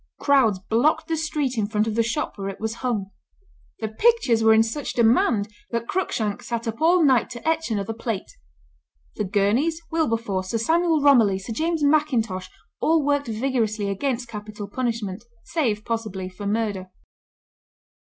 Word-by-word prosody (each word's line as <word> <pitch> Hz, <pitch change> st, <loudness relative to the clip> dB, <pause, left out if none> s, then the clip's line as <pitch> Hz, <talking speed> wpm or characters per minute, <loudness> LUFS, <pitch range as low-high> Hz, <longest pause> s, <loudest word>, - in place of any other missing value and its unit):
Crowds 260 Hz, -8 st, +3 dB
blocked 245 Hz, +11 st, +1 dB
the 325 Hz, -, 0 dB
street 295 Hz, -6 st, -1 dB
in 205 Hz, -, 0 dB
front 210 Hz, 0 st, 0 dB
of 225 Hz, -, -2 dB
the 230 Hz, -, +2 dB
shop 235 Hz, +7 st, -2 dB
where 195 Hz, -1 st, -4 dB
it 195 Hz, -, -8 dB
was 220 Hz, 0 st, -2 dB
hung. 215 Hz, -7 st, -2 dB, 0.7 s
The -, -, -1 dB
pictures 245 Hz, -, +2 dB
were 220 Hz, -, +6 dB
in 220 Hz, 0 st, +6 dB
such 230 Hz, +6 st, -4 dB
demand 230 Hz, -2 st, +3 dB, 0.2 s
that 235 Hz, 0 st, -3 dB
Cruikshank 220 Hz, -, -1 dB
sat 235 Hz, 0 st, -4 dB
up 225 Hz, +3 st, -4 dB
all 340 Hz, +2 st, +5 dB
night 260 Hz, -4 st, +3 dB
to 240 Hz, +5 st, -8 dB
etch 320 Hz, -2 st, +1 dB
another 210 Hz, -1 st, -2 dB
plate. 225 Hz, -3 st, -4 dB, 0.9 s
The -, -, 0 dB
Gurneys, 220 Hz, -, +1 dB
Wilberforce, 230 Hz, -, -1 dB
Sir 230 Hz, -, 0 dB
Samuel 325 Hz, +6 st, +2 dB
Romilly, 230 Hz, -9 st, +5 dB
Sir 195 Hz, +4 st, -6 dB
James 320 Hz, +5 st, -1 dB
Mackintosh, 240 Hz, -11 st, +1 dB, 0.3 s
all 320 Hz, -2 st, +2 dB
worked 285 Hz, -1 st, +1 dB
vigorously 220 Hz, -3 st, -1 dB
against 245 Hz, +4 st, -2 dB
capital 210 Hz, -2 st, -7 dB
punishment, 225 Hz, -3 st, -3 dB, 0.2 s
save, 225 Hz, -10 st, -1 dB
possibly, 215 Hz, -5 st, -3 dB
for 195 Hz, +2 st, -7 dB
murder. 205 Hz, -3 st, -1 dB
230 Hz, 160 wpm, -24 LUFS, 210-285 Hz, 0.9 s, were